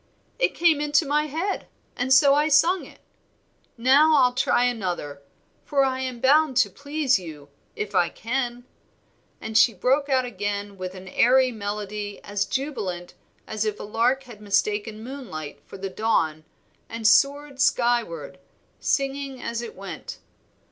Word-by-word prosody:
"It - - +1
came 330 -4 +3
into 295 +1 +2
my 300 +2 +1
head, 335 +7 -3 0.3
and 250 +1 -2
so 275 +1 +7
I 295 +2 +3
sung 330 +5 +3
it. - - -17 0.8
Now 280 +6 +5
I'll 250 -3 +4
try 245 -1 +2
another, 180 -12 -2 0.4
for 280 -1 +1
I 260 -1 -1
am 255 -2 -4
bound 280 +1 +3
to 270 - +3
please 285 -4 0
you 150 -5 -10 0.3
if 210 -1 -4
I 175 - +3
can." 245 0 -3 0.8
And 220 0 -7
she 225 0 +5
broke 270 +8 +1
out 260 -2 +2
again 205 -2 -4
with 185 0 -6
an 185 0 -10
airy 255 +6 +4
melody 205 -1 -5
as 205 0 -2
jubilant 205 -10 -4 0.3
as 215 -1 -3
if 215 -1 -2
a - - -6
lark 235 +6 +1
had 235 -5 -13
mistaken 210 +1 -1
moonlight 185 - -8
for - - -10
the 195 +1 -4
dawn 165 -7 0 0.4
and 225 -1 -1
soared 280 +2 +3
skyward, 225 - 0 0.4
singing 275 -1 -1
as 235 -1 -4
it 240 - -8
went. - - -8
240 Hz, 150 wpm, -24 LUFS, 205-275 Hz, 0.8 s, so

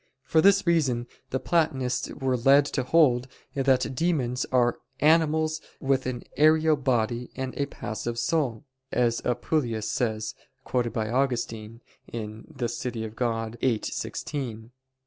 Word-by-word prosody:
For 160 - +3
this 200 +2 +5
reason 140 -9 +2 0.2
the 130 - -1
Platonists 135 -8 0
were 130 -1 0
led 135 +4 +5
to 140 - -1
hold 130 -3 +3 0.3
that 135 -1 +2
demons 130 -5 0
are 120 -2 +3 0.2
"animals 155 0 +3 0.2
with 135 -1 +1
an 125 -1 -4
aerial 155 +1 +5
body 120 -3 0
and 130 -1 -4
a 140 - -1
passive 115 -2 -5
soul," 120 -1 0 0.3
as 120 -1 +1
Apuleius 120 -3 -1
says, 110 -3 -1 0.3
quoted 120 -2 0
by 110 0 -2
Augustine 115 -3 -1 0.3
(De 115 +4 -5
Civ. 120 +1 -4
Dei 110 -1 -3
viii, 115 0 -1
16). 120 -6 -4
125 Hz, 125 wpm, -26 LUFS, 115-145 Hz, 0.3 s, this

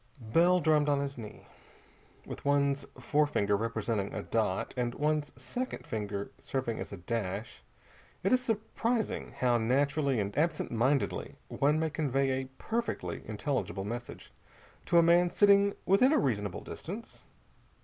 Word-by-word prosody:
Bell 180 +2 +5
drummed 150 -2 +3
on 145 -1 +3
his 140 0 -3
knee. 110 -4 -10 0.8
With - - -8
one's 140 0 +2
forefinger 145 -9 +2
representing 110 -1 -1
a 105 - -3
dot, 105 -4 -1
and 120 -1 -1
one's 150 0 0
second 255 +1 -5
finger 100 -2 -4
serving 130 -4 -3
as - - -6
a 100 - -6
dash, 105 +2 -4 0.6
it 195 - +3
is 255 0 +3
surprising 225 0 -1
how 120 -2 +3
naturally 140 +2 +1
and 100 0 -2
absentmindedly 145 -4 0
one 150 +2 +2
may 160 -1 0
convey 135 -3 +1
a 130 0 -1
perfectly 235 +1 -3
intelligible 110 -3 -2
message 120 +3 -7 0.5
to 170 - +4
a 170 - +7
man 175 +1 +5
sitting 200 +1 +5
within 200 +8 +5
a 310 - +4
reasonable 105 -8 -1
distance. 210 +8 -8
140 Hz, 140 wpm, -31 LUFS, 115-170 Hz, 0.8 s, a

